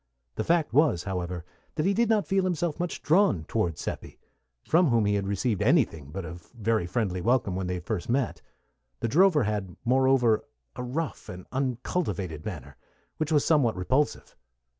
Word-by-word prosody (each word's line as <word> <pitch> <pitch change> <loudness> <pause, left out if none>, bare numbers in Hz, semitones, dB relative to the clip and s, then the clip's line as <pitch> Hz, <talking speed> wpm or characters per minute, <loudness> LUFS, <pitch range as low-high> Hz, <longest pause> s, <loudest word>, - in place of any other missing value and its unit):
The 110 - -2
fact 165 -2 +1
was, 145 - +3
however, 90 -3 -4 0.3
that 155 - 0
he 195 - +3
did 230 +2 +2
not 215 -2 +3
feel 195 0 +1
himself 175 -3 -1
much 175 0 -3
drawn 150 - +3
toward 85 -4 -1
Seppi, - - -6 0.5
from 170 +2 +4
whom 115 -5 +3
he 105 - +2
had 100 -1 -1
received 100 +1 -1
anything 75 -4 +2
but 95 +4 -5
a 85 +2 -7 0.2
very 110 -4 +1
friendly 90 -2 -1
welcome 115 -3 +1
when 95 -1 -2
they 90 0 -2
first 90 +3 -4
met; 130 0 0 0.6
the - - +1
drover 160 - +4
had, 105 -5 -3
moreover, 130 -3 +3 0.3
a - - -5
rough 140 +6 -4
and 90 0 -8
uncultivated 120 - -2
manner, 90 - -7 0.4
which 155 0 -2
was 150 -2 +3
somewhat 145 -8 +3
repulsive. 130 +11 -1
115 Hz, 170 wpm, -27 LUFS, 90-150 Hz, 0.6 s, from